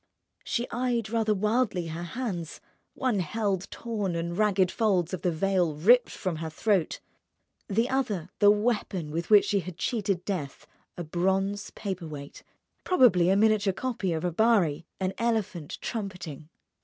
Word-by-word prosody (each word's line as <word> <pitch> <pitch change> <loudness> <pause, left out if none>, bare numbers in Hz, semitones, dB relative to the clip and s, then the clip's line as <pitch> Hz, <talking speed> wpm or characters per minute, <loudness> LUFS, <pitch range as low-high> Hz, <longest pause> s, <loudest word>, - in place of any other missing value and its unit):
She 240 +1 -2
eyed 240 -3 -1
rather 220 -2 +1
wildly 210 -4 0
her 160 +2 -5
hands. 175 -4 -4 0.4
One 250 -6 0
held 195 +1 -1
torn 210 -6 -3
and 170 +1 -3
ragged 195 -3 +2
folds 190 -6 +1
of 185 - -3
the 180 - +1
veil 175 -1 +1
ripped 235 +11 +5
from 185 -5 -3
her 160 0 -4
throat, 190 +1 0 0.7
the 225 +4 +2
other 215 -11 -1
the 205 - +7
weapon 205 -7 0
with 165 +2 -3
which 210 -2 +7
she 200 - +1
had 180 -2 -7
cheated 195 -1 -1
death: 155 -9 -4 0.3
a 175 - -3
bronze 190 +5 0
paperweight, 160 -8 -6 0.4
probably 225 - +4
a 190 - +4
miniature 210 -1 +3
copy 230 -4 -2
of 160 +1 -2
a 175 - 0
Barye, 170 -6 +2
an 190 0 -1
elephant 215 -9 -1
trumpeting. 180 - -5
195 Hz, 150 wpm, -27 LUFS, 170-220 Hz, 0.7 s, the